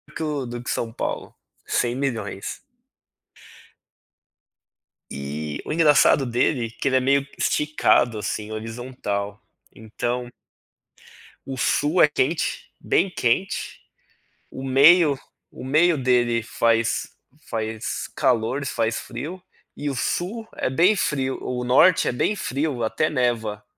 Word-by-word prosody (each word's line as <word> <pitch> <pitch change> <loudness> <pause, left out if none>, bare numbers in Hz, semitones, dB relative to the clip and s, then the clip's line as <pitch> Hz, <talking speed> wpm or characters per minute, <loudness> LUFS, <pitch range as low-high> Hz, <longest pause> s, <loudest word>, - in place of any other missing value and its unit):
que 160 - -3
o, 150 -4 -2
do 120 0 -6
que - - -5
São 115 -1 -2
Paulo, - - -4 0.3
100.000.000. 120 -5 -2 2.5
E, 75 +2 -5
o - - -5
engraçado 150 -3 +5
dele 120 0 +1
é - - -11
que 115 +4 -4
ele 130 - +2
é - - +4
meio 140 +2 +2
esticado 120 -6 +2
assim 105 +1 -4
horizontal, 110 -2 -5 0.3
então 120 +3 -4 1.1
o 135 -1 -5
sul 150 +7 +2
é - - +8
quente, 150 +2 -1
bem 195 - +1
quente, 180 +4 -1 0.7
o 130 - -8
meio 145 +3 +6 0.3
o - - -10
meio 155 +5 +3
dele 120 -3 +2
faz 115 0 +1 0.4
faz 110 0 -3
calor 125 +3 +1
e - - -6
faz 115 -3 -1
frio, 155 +10 -7 0.4
e 145 - -3
o 135 - -3
sul 215 - -2
é - - -1
bem 175 +10 +4
frio, 135 -7 -1
o 125 -1 -3
norte 160 +8 +5
é - - +2
bem 125 +12 0
frio, 140 - -2
até 135 +7 0
neva, 115 -6 -1
125 Hz, 125 wpm, -23 LUFS, 115-150 Hz, 2.5 s, é